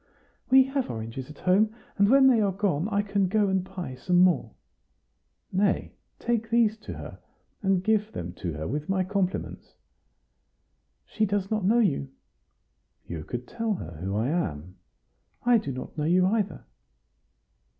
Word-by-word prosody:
"We 265 +1 +8
have 270 0 -2
oranges 115 +3 -6
at 150 - -11
home; 210 +4 +2 0.2
and 200 0 +4
when 270 +1 +6
they 250 -4 +5
are 200 -2 +2
gone, 190 -2 0
I 205 -1 +1
can 200 -1 +1
go 205 +1 +2
and 190 -1 +1
buy 185 -7 -6
some 175 +8 0
more." 180 0 +3 1.0
"Nay, 195 +1 +1 0.2
take 230 -1 -1
these 230 -2 +3
to 215 - -8
her, - - -9 0.4
and 190 -3 +1
give 215 +1 +1
them 85 0 -6
to 85 -3 -4
her 75 +1 -4
with 150 +6 -4
my 190 -1 +2
compliments." 190 -1 -3 1.3
"She 215 0 0
does 195 0 -1
not 215 -3 0
know 220 +5 +4
you." 150 - +1 1.0
"You 80 -3 -6
could 120 +7 -6
tell 225 -2 -2
her 85 - -8
who 95 +4 -3
I 110 +5 0
am." 90 - -3 0.7
"I 240 -1 +5
do 200 -10 -5
not 130 0 -7
know 150 -1 -2
you 180 +3 +4
either." 205 0 -1
190 Hz, 160 wpm, -27 LUFS, 145-215 Hz, 1.3 s, We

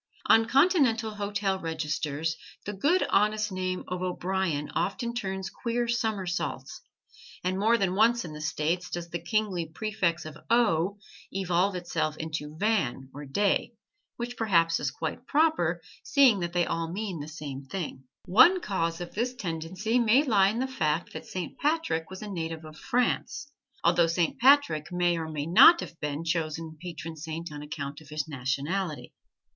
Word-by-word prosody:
On 225 0 +5
Continental 260 - +3
hotel 205 -2 -1
registers 160 -1 -2 0.3
the 210 - -4
good, 300 - +2
honest 210 0 +2
name 185 -1 -2
of 180 0 -4
O'Brian 180 -4 -1
often 235 +4 -1
turns 190 -5 -4
queer 240 0 -2
somersaults, 215 -6 -2 0.6
and 185 +1 -1
more 225 +3 +4
than 195 -4 0
once 230 +2 +3
in 155 - -7
"The 150 - -8
States" 165 +4 -1
does 170 -1 -5
the 170 - -2
kingly 190 -3 -1
prefix 175 -2 -1
of 155 0 -9
O 205 -5 +2 0.3
evolve 185 0 +1
itself 170 -3 -2
into 155 -1 -5
Van 160 - 0
or 145 +1 -8
De, 200 +8 +1 0.4
which 240 +1 -5
perhaps 170 -7 +3
is 140 - -1
quite 165 - -5
proper, 280 - +2 0.2
seeing 265 -8 +5
they 175 0 0
all 165 0 -2
mean 195 -3 -4
the 145 - -6
same 145 -3 -7
thing. 155 -5 -5 0.2
One 255 - +6
cause 170 - -2
of 175 - -7
this 245 +4 -1
tendency 185 +5 -2
may 240 +4 +5
lie 200 -8 +4
in 215 - -3
the 260 +2 0
fact 165 -10 -1
that - - -8
Saint 180 -3 -6
Patrick 295 - 0
was 190 +2 -8
a - - -6
native 165 -4 -4
of 155 0 -11
France; 265 - -1 0.3
although 170 0 +4
Saint 165 0 0
Patrick 245 - +4
may 175 -1 +2
or 160 -1 -4
may 150 -2 -3
not 255 - +8
have 170 - -9
been 150 +1 -3
chosen 160 -1 -2
patron 165 -2 -7
saint 160 +1 -6
on 145 -1 -7
account 145 0 -6
of 150 - -16
his 150 -1 -3
nationality. 145 +5 -3
180 Hz, 160 wpm, -28 LUFS, 160-215 Hz, 0.6 s, not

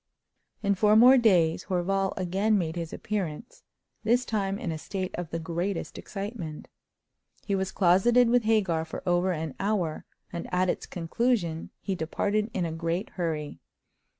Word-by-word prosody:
In 200 0 +3
four 210 +2 +4
more 250 +4 +8
days 175 -8 +3
Horval 195 +1 0
again 195 +4 +1
made 165 -3 -2
his 170 -2 -4
appearance, 205 0 -4 0.4
this 240 +3 +2
time 200 -3 -1
in 175 - -3
a 160 - -4
state 185 +3 -4
of 175 -2 -5
the 165 - -3
greatest 170 +3 -3
excitement. 195 -6 -6 0.8
He 200 - -1
was 190 -1 0
closeted 215 +7 +4
with 240 -1 +3
Hagar 195 -8 +2
for 160 - -8
over 175 +1 +2
an 160 -4 -3
hour, 195 -6 -1 0.3
and 170 - -5
at 180 0 +2
its - - -6
conclusion 175 -1 -1
he 195 - -2
departed 205 +6 -1
in 185 -5 -1
a 165 - -3
great 165 +5 -2
hurry. 155 - -3
185 Hz, 155 wpm, -27 LUFS, 165-210 Hz, 0.8 s, more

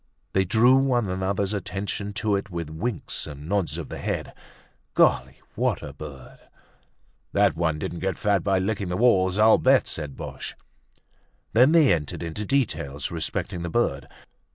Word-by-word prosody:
They 95 0 +2
drew 120 +7 +5
one 125 -5 +2
another's 95 +2 -1
attention 100 +1 -4
to 105 -1 0
it 100 +1 -3
with 85 -4 -5
winks 100 +6 -3
and 75 +1 -9
nods 85 -6 0
of 85 - -6
the - - -6
head. - - -3 0.6
Golly! - - +3
What - - 0
a - - -7
bird! 70 -4 -10 0.9
"That - - +3
one 80 -2 0
didn't 85 +2 -4
get 95 -3 -2
fat 100 -3 +1
by 95 -1 +2
licking 100 0 -1
the 90 - -1
walls, 95 -6 +3
I'll 110 +1 +6
bet!" 130 0 +4
said 75 -4 -4
Boche. - - -7 1.0
Then 125 +7 +6
they 160 - +6
entered 75 -1 -3
into 85 +6 -4
details 80 - -1
respecting 85 +1 -3
the 85 - -3
bird. 80 -9 0
95 Hz, 160 wpm, -25 LUFS, 80-110 Hz, 1.0 s, I'll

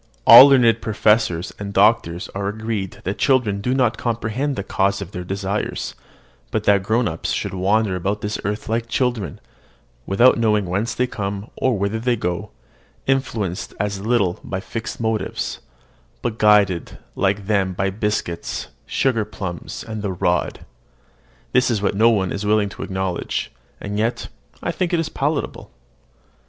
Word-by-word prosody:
All 125 +4 +12
learned 120 -5 +4
professors 105 -4 +1
and 100 -1 -5
doctors 100 -4 +3
are 100 0 -4
agreed 110 -2 -4
that 95 +3 -3
children 120 -7 +2
do 125 +5 0
not 125 -4 +1
comprehend 120 +4 -1
the 100 - -3
cause 100 0 0
of 100 -2 -7
their 90 - -5
desires; 95 +2 -3 0.6
but - - -1
that 100 - +5
the - - -12
grown 110 +3 +1
up 80 0 -4
should - - -2
wander 100 +2 +1
about 100 +3 -2
this 105 0 -3
earth 105 +2 -3
like 115 +1 -1
children, 115 - -1 0.7
without 120 +6 +5
knowing 105 -3 +2
whence 100 +6 -2
they 125 - +2
come, 100 -2 -5
or 130 -4 +1
whither 100 +3 -1
they 120 +1 +1
go, 90 -6 -3 0.6
influenced 115 -7 -1
as 100 -1 -1
little 105 -5 +1
by 95 - -4
fixed 115 +3 -6
motives, 110 -2 -2 0.6
but 115 -2 -2
guided 105 -5 +3 0.2
like 100 +1 0
them 95 -3 +1
by 95 +2 -1
biscuits, 105 -4 -3 0.2
sugar 125 -5 +1
plums, 95 -5 -6
and 110 -1 -5
the 100 -2 -2
rod, 90 - -1 0.9
this 125 +1 +3
is 115 -3 +1
what 100 - 0
nobody 105 -3 +3
is 100 - -4
willing 105 -1 +2
to - - -10
acknowledge; 95 -2 -3 0.3
and 105 +1 -4
yet 115 +3 -1 0.3
I - - 0
think 180 -1 -2
it 170 - +3
is 165 - -1
palpable. 145 +1 -2
105 Hz, 160 wpm, -21 LUFS, 95-115 Hz, 0.9 s, All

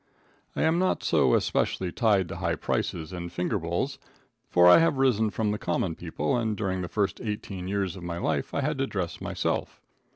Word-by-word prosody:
I - - 0
am 160 +2 +3
not 185 0 +1
so 70 -6 +3
especially 90 -2 0
tied 100 -5 +2
to - - -5
high - - 0
prices 80 0 -2
and 85 -1 -5
finger 90 +4 -1
bowls, 85 +1 -2 0.5
for 90 0 +6
I 90 - +9
have 165 -4 +2
risen 120 -5 +3
from 105 +2 -1
the 105 - -2
common 85 - -1
people, 80 0 -2
and 110 -3 -1
during 95 -3 -1
the 90 - -3
first 100 -2 -1
eighteen 100 -4 -5
years 100 -1 -1
of 95 - -9
my 85 0 -4
life - - -1
I - - -1
had 145 0 -1
to 135 - +1
dress 90 -7 -4
myself. - - -2
95 Hz, 200 wpm, -27 LUFS, 90-110 Hz, 0.5 s, I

